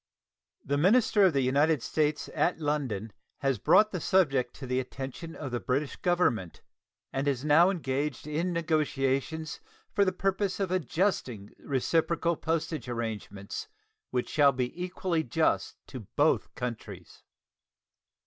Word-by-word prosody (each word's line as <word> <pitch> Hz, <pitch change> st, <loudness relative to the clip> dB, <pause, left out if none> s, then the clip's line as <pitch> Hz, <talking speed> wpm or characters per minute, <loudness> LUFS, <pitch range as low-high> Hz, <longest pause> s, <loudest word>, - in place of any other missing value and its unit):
The 140 Hz, +1 st, 0 dB
minister 205 Hz, +3 st, +5 dB
of 180 Hz, -, +4 dB
the 135 Hz, -1 st, +2 dB
United 140 Hz, +1 st, +2 dB
States 150 Hz, -1 st, 0 dB
at 175 Hz, -, +1 dB
London 130 Hz, -9 st, -2 dB, 0.3 s
has 135 Hz, -3 st, +1 dB
brought 215 Hz, 0 st, +5 dB
the 180 Hz, -, -3 dB
subject 135 Hz, -11 st, +2 dB
to 135 Hz, -, -8 dB
the 125 Hz, 0 st, 0 dB
attention 135 Hz, +5 st, -6 dB
of 135 Hz, -4 st, -6 dB
the 120 Hz, -, -1 dB
British 130 Hz, +8 st, -1 dB
Government, 145 Hz, -, 0 dB, 0.5 s
and 135 Hz, +2 st, -1 dB
is 135 Hz, 0 st, 0 dB
now 160 Hz, +5 st, +6 dB
engaged 145 Hz, -6 st, -2 dB
in 160 Hz, +4 st, -1 dB
negotiations 155 Hz, -2 st, -1 dB, 0.3 s
for 200 Hz, -, +4 dB
the 190 Hz, -, +2 dB
purpose 195 Hz, +1 st, -1 dB
of 190 Hz, -2 st, -1 dB
adjusting 155 Hz, -, -1 dB
reciprocal 165 Hz, +5 st, 0 dB
postal 160 Hz, 0 st, -2 dB
arrangements 110 Hz, -4 st, -5 dB, 0.4 s
which 125 Hz, -1 st, -1 dB
shall 145 Hz, -2 st, +5 dB
be 125 Hz, -1 st, -2 dB
equally 180 Hz, -2 st, -1 dB
just 155 Hz, +5 st, 0 dB
to 130 Hz, -, -8 dB
both 125 Hz, +9 st, 0 dB
countries. 105 Hz, -7 st, -7 dB
150 Hz, 135 wpm, -29 LUFS, 125-170 Hz, 0.5 s, now